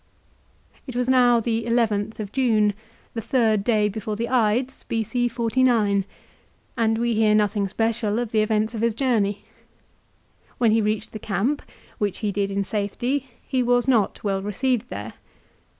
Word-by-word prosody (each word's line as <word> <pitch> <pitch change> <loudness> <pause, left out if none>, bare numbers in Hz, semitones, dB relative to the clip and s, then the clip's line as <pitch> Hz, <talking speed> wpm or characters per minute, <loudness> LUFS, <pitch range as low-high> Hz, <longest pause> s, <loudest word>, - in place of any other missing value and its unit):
It 255 - -7
was 250 0 0
now 245 -2 +5
the 230 0 -1
llth 220 -2 0
of 205 -2 -5
June, 220 -5 +2 0.4
the 230 - -3
third 220 -4 +1
day 215 -2 +2
before 210 +1 -4
the 235 +2 -3
Ides, 250 +2 +1
B.C. 235 +2 -1
49, 230 -4 +2 0.7
and 225 -1 +1
we 235 0 0
hear 215 -1 +3
nothing 205 -1 +1
special 225 +1 0
of 240 -2 -2
the 215 - +3
events 215 +1 0
of 220 - -4
his 230 -2 +1
journey. 220 -6 0 1.1
When 230 -3 +3
he 225 +1 +3
reached 215 0 -1
the 215 - -7
camp, 215 +9 -1 0.4
which 205 -3 -1
he 205 - +1
did 200 0 -1
in 200 0 -1
safety, 230 +7 -2 0.2
he 260 -2 0
was 245 0 +2
not 230 -7 +1
well 195 -2 0
received 225 +4 -1
there. 105 +2 -6
225 Hz, 160 wpm, -23 LUFS, 210-240 Hz, 1.1 s, now